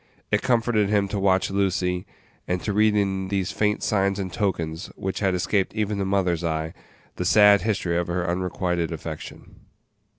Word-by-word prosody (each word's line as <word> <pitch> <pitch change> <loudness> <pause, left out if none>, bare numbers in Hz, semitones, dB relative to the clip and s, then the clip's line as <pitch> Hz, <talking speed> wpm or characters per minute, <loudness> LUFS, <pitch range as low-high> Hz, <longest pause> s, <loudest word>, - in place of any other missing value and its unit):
It 105 - +2
comforted 115 -4 +2
him 100 -2 +2
to 100 0 -2
watch 95 0 +2
Lucy, 95 -2 0 0.4
and 90 0 0
to 105 - -1
read 105 +1 +3
in 95 -2 0
these 95 -1 -1
faint 105 -1 0
signs 100 -1 +1
and 95 -3 -4
tokens, 85 -4 -2
which 95 -1 -4
had 95 -2 +1
escaped 95 +3 0
even 105 -2 -1
a - - 0
mother's 90 -3 0
eye, 80 -1 -2 0.4
the - - -1
sad 100 +2 +6
history 95 -4 -1
of 85 - -1
her 85 0 -1
unrequited 90 -1 -1
affection. 80 -1 -8
95 Hz, 170 wpm, -24 LUFS, 90-105 Hz, 0.4 s, sad